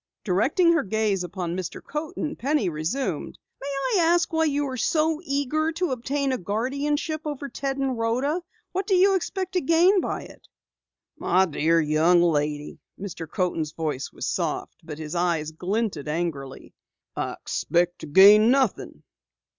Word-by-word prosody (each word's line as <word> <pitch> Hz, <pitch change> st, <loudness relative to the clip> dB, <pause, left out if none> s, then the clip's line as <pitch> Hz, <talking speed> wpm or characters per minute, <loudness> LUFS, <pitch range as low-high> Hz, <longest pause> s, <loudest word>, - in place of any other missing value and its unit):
Directing 270 Hz, -, +3 dB
her 330 Hz, -, +3 dB
gaze 210 Hz, -4 st, 0 dB
upon 175 Hz, -1 st, -4 dB
Mr. 185 Hz, -2 st, -5 dB
Coaten, 300 Hz, 0 st, -4 dB
Penny 275 Hz, -6 st, 0 dB
resumed: 165 Hz, -, -3 dB, 0.2 s
"May 275 Hz, -, -6 dB
I 280 Hz, -, 0 dB
ask 335 Hz, 0 st, +2 dB
why 320 Hz, 0 st, +2 dB
you 290 Hz, -1 st, 0 dB
are 260 Hz, -, -4 dB
so 315 Hz, +4 st, +1 dB
eager 305 Hz, +1 st, 0 dB
to 340 Hz, -1 st, -1 dB
obtain 270 Hz, +3 st, -1 dB
a 255 Hz, -, -1 dB
guardianship 280 Hz, -, -2 dB
over 290 Hz, -2 st, -4 dB
Ted 275 Hz, 0 st, -3 dB
and 270 Hz, -2 st, -1 dB
Rhoda? 250 Hz, +9 st, 0 dB, 0.3 s
What 380 Hz, +1 st, -2 dB
do 390 Hz, -, +3 dB
you 390 Hz, +2 st, +5 dB
expect 375 Hz, 0 st, -2 dB
to 365 Hz, -2 st, 0 dB
gain 345 Hz, +6 st, +4 dB
by -, -, -3 dB
it?" -, -, -15 dB, 0.7 s
"My 190 Hz, +1 st, +3 dB
dear 165 Hz, 0 st, +2 dB
young 160 Hz, +3 st, +3 dB
lady 150 Hz, -3 st, -1 dB
" -, -, -33 dB
Mr. 180 Hz, -5 st, -6 dB
Coaten's 165 Hz, -4 st, -1 dB
voice 150 Hz, -4 st, -3 dB
was -, -, -6 dB
soft -, -, -2 dB
but 150 Hz, -2 st, -8 dB
his 155 Hz, 0 st, -6 dB
eyes 170 Hz, -3 st, 0 dB
glinted 185 Hz, -2 st, -2 dB
angrily. 150 Hz, -4 st, -4 dB, 0.4 s
"I -, -, -2 dB
expect 175 Hz, +1 st, -1 dB
to -, -, -8 dB
gain 205 Hz, +8 st, +7 dB
nothing." 265 Hz, -3 st, 0 dB
235 Hz, 160 wpm, -25 LUFS, -, 0.7 s, gain